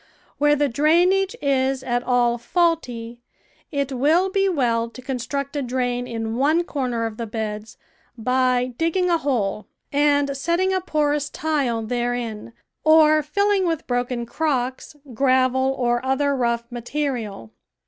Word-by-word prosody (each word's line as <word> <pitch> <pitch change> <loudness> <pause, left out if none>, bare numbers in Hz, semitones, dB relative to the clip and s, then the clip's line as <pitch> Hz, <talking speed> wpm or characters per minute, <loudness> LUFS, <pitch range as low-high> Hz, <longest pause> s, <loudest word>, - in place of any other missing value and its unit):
Where 295 0 +4
the 290 0 +1
drainage 345 +9 +2
is 265 -1 +1
at 245 -1 0
all 245 -1 +1
faulty 245 -6 -1 0.5
it 280 -2 -1
will 315 +9 +2
be 390 0 +2
well 235 -8 0
to 235 - -13
construct 270 +2 -4
a 290 - 0
drain 245 -1 -2
in 225 0 -4
one 310 +6 +3
corner 250 -8 -2
of 220 -1 -5
the 230 - -4
beds 215 0 -5 0.4
by 250 +1 +1
digging 350 +2 +1
a 335 - +3
hole 220 -9 -1 0.3
and 285 -1 +2
setting 340 +7 0
a 375 - 0
porous 295 -4 0
tile 275 -8 -1
therein, 240 -1 -3 0.3
or 310 -1 +6
filling 395 +5 +1
with 325 -3 -2
broken 245 -1 -2
crocks, 260 0 -2 0.2
gravel, 260 +1 +2
or 240 -1 0
other 275 +2 +1
rough 235 -2 0
material. 240 - -4
260 Hz, 140 wpm, -22 LUFS, 240-300 Hz, 0.5 s, or